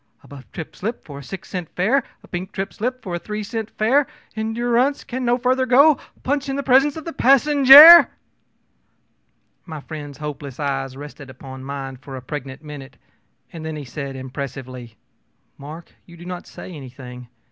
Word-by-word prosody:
a - - -17
buff 140 -2 -13
trip 160 - -8
slip 225 +5 -5
for 140 -2 -9
a - - -11
six 190 +6 -9
cent 180 -4 -6
fare, 235 +9 +2 0.2
a - - -16
pink 185 +2 -6
trip 195 0 -5
slip 250 +3 -4
for 185 - -6
a 175 - -2
three 210 +3 -5
cent 225 0 -5
fare 255 +6 +1 0.3
endu 225 +2 -3
rance 265 +4 +1
can 255 +1 -5
no 240 0 +2
fur 255 0 +1
ther 260 0 -1
go! 280 +5 +6 0.3
PUNCH 280 +1 -1
in 270 - -2
the 280 - -3
presence 275 +3 +3
of 315 - -8
the 330 - -6
passenjare!ö 285 +4 +9 1.6
My 160 -3 -8
friend's 145 -2 -9
hopeless 145 -3 -7
eyes 135 -2 -3
rested 145 -1 -10
upon 130 0 -11
mine 135 -1 -7
a 135 -2 -8
pregnant 135 +2 -7
minute, 140 -4 -10 0.6
and 165 -2 -8
then 160 0 -5
he 150 -2 -7
said 135 +2 -7
impressively: 130 -3 -8 0.6
ōMark, 155 +4 -10 0.2
you 170 -1 -15
do 175 - -12
not 180 -1 -7
say - - -10
anything. 125 -3 -11
170 Hz, 180 wpm, -21 LUFS, -, 1.6 s, passenjare!ö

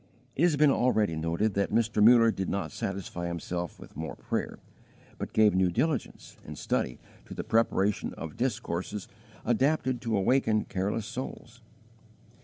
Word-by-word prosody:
It - - -2
has 170 -3 +4
been 145 -1 +5
already 110 -10 +2
noted 85 +7 0
that 100 +1 0
Mr. 110 -1 +2
Muller 115 0 +7
did 95 -3 -3
not 100 - -2
satisfy 95 -3 -4
himself 85 0 -4
with - - -13
more 80 +2 -5
prayer, - - -3 0.6
but - - -4
gave 110 -1 +4
new 95 -1 +3
diligence 140 - -2
and - - -9
study 60 - -1 0.3
to - - -9
the - - -4
preparation 105 -3 +1
of 80 -2 -7
discourses 105 -5 -3 0.4
adapted 130 +1 +1
to 115 -4 0
awaken 110 +1 +2
careless 100 +3 -2
souls. 130 +4 -7
105 Hz, 150 wpm, -29 LUFS, 95-120 Hz, 0.6 s, Muller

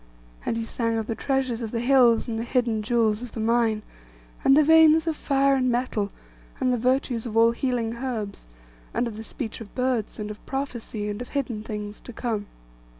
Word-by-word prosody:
And 230 - 0
he 230 - -2
sang 230 0 -1
of 220 - -1
the 225 - -2
treasures 260 -1 -1
of 225 - -3
the 230 - -2
hills, 245 -2 +4
and 225 -2 -2
the - - -2
hidden 235 -3 0
jewels 220 -1 +1
of 245 -2 -8
the - - -5
mine, 225 -1 +2 0.6
and 270 - +6
the 305 - +7
veins 320 +1 +6
of 325 -2 0
fire 275 -1 +2
and 255 -1 +1
metal, 240 -4 -1 0.5
and 255 -1 +2
the - - +1
virtues 250 -1 0
of 225 -1 -3
all 230 0 +6
healing 235 -2 -1
herbs, 225 - -4 0.5
and 240 - +1
of 225 - -6
the 220 - -7
speech 225 -1 -6
of 205 - -11
birds, 250 -4 -1
and 210 0 -4
of 210 - -11
prophecy, 240 -6 -4
and 205 +2 -4
of 245 - -7
hidden 250 -6 -2
things 210 -1 -6
to 245 - -10
come. 220 -4 -3
235 Hz, 210 wpm, -25 LUFS, 220-260 Hz, 0.6 s, the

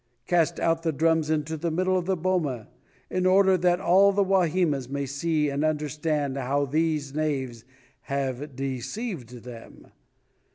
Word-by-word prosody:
Cast 170 0 +1
out 165 0 +1
the 165 -1 0
drums 160 +1 +1
into 155 0 -1
the 165 +2 -2
middle 185 +3 +1
of 180 -1 -1
the 190 -1 +1
boma, 160 - -1 0.4
in 185 0 +1
order 190 0 +5
that 175 0 +2
all 195 +3 +5
the 200 0 +2
Wahimas 175 -8 +1
may 140 0 -2
see 150 +3 0
and 140 +1 -1
understand 150 -2 -1
how 140 +2 0
these 150 -1 -1
knaves 135 -7 -2 0.4
have 135 0 -3
deceived 130 - -5
them. 120 -2 -12
155 Hz, 150 wpm, -26 LUFS, 140-175 Hz, 0.4 s, order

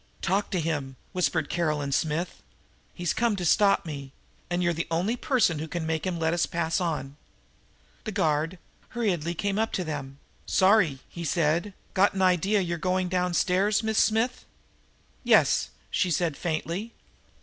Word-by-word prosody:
"Talk 195 +3 +1
to 185 - -1
him," 145 -5 -2 0.2
whispered 170 -4 0
Caroline 150 -4 -1
Smith. 160 +5 -1 0.5
"He's 175 -1 -2
come 235 -3 +1
to 180 -3 -3
stop 200 +2 +4
me, 140 -4 -7 0.4
and 175 0 0
you're 175 0 +2
the 165 +1 -3
only 180 +8 0
person 240 - +1
who 160 - -4
can 170 0 -3
make 160 +2 -1
him 180 -2 -2
let 160 0 +1
me 175 - -1
pass 165 +1 0
on!" 150 -5 -3 0.9
The - - -3
guard 155 +3 0 0.4
hurriedly 175 -7 0
came 200 +4 -1
up 225 0 0
to 185 - 0
them. 140 -4 -5 0.3
"Sorry," 185 -9 +4
he 170 - -7
said. 170 +4 0 0.2
"Got 200 +1 +3
an 190 - +1
idea 185 +3 +3
you're 170 -2 -2
going 185 +1 0
downstairs, 180 +4 +1
Miss 220 0 +1
Smith." 230 +3 +1 0.8
"Yes," - - +4 0.2
she 185 - +1
said 170 -2 0
faintly. 175 +7 -3
175 Hz, 160 wpm, -27 LUFS, 160-195 Hz, 0.9 s, stop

